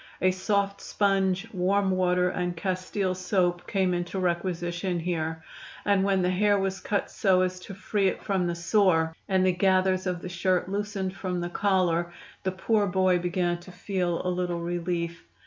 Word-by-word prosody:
A 185 - +3
soft 200 +1 0
sponge, 195 -1 +1
warm 190 +1 +2
water 180 -1 +2
and 180 -1 -2
castile 185 +1 -1
soap 180 -1 0
came 190 -2 +1
into 175 +2 -3
requisition 175 0 -1
here, 160 -2 -2 0.4
and 200 -2 +3
when 195 -2 +2
the 180 - +2
hair 205 +2 +3
was 195 0 -1
cut 205 - -2
so 185 -2 +3
as 185 0 -2
to 190 +1 -9
free 200 0 0
it - - -2
from 190 -3 0
the 170 - -1
sore, 170 -3 +2
and 190 -1 +3
the 185 - +4
gathers 185 0 +2
of 180 -1 -2
the - - -4
shirt 180 +1 0
loosened 200 -1 -3
from 185 -2 -3
the 175 0 -3
collar, 175 -3 +1 0.3
the 190 - -1
poor 205 +2 +1
boy 185 -1 +2
began 175 0 0
to 180 +2 -12
feel 180 -2 -2
a - - +1
little 180 -1 -1
relief. 170 0 -2
185 Hz, 175 wpm, -27 LUFS, 175-195 Hz, 0.4 s, the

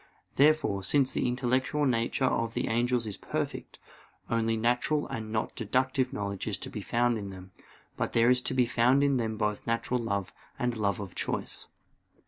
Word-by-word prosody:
Therefore, 145 -8 +3
since 130 +7 +2
the - - 0
intellectual 130 +4 0
nature 120 +1 +1
of 115 -2 0
the - - -1
angels 120 +1 +1
is 105 -3 -5
perfect, - - -4 0.5
only 115 0 +1
natural 120 +6 +1
and 110 -5 -5
not 110 0 -2
deductive 130 +3 0
knowledge 100 -5 -4
is - - 0
to - - -7
be - - -5
found 120 -1 +1
in 100 -1 -6
them, 95 0 -10 0.5
but - - -2
there 115 +1 +5
is 125 0 +3
to 130 - -3
be 125 -1 +4
found 125 +4 +3
in 140 -2 +3
them 110 -2 -2
both 105 +1 -2
natural 115 +2 0
love 100 -5 -2 0.2
and 120 -1 -1
love 100 -2 0
of 100 -3 -6
choice. - - -4
120 Hz, 180 wpm, -29 LUFS, 110-130 Hz, 0.5 s, there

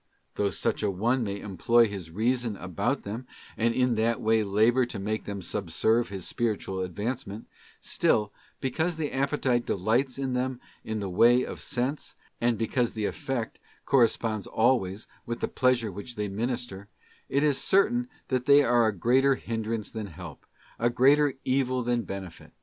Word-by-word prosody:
Though 100 -1 0
such - - -1
an 100 -3 -1
one 120 +5 +1
may 100 -2 -3
employ 110 +5 +3
his 95 -5 -7
Reason 115 +3 0
about 100 - -2
them, 115 +5 -6 0.3
and 115 +1 +2
in 125 +1 +2
that 115 +1 +1
way 110 0 +2
labour 110 +6 +3
to 120 - -6
make 105 +2 -3
them 100 -2 -5
subserve 105 +6 0
his 95 -3 -5
spiritual 105 -5 -2
advancement; 105 +4 -4 0.4
still, 105 -1 +1 0.3
because 160 +6 -1
the 155 -2 -2
appetite 135 -3 +1
delights 120 +7 +1
in 135 -2 -2
them 125 0 -1 0.2
in 110 -1 -3
the 100 - -3
way 120 +7 +5
of - - -7
sense, 130 +4 -3 0.3
and 120 -1 +2
because 115 +2 0
the 110 -1 -2
effect 120 +1 -3 0.3
corresponds 115 -4 +2
always 110 -4 +1 0.2
with 120 0 -3
the - - -1
pleasure 125 -4 +1
which 100 +6 -8
they 105 -1 -2
minister, 110 -1 -4 0.4
it 140 +1 +1
is 145 -3 +2
certain 240 +6 +2 0.2
that 130 0 -1
they 145 0 +7
area 120 -3 +3
greater 130 +7 +3
hindrance 110 -3 -4
than 110 -2 -5
help, 85 -3 -10 0.3
a 120 - +3
greater 140 +4 +4
evil 130 -1 +1
than 120 0 +1
benefit. 95 -4 -8
115 Hz, 160 wpm, -27 LUFS, 105-130 Hz, 0.4 s, they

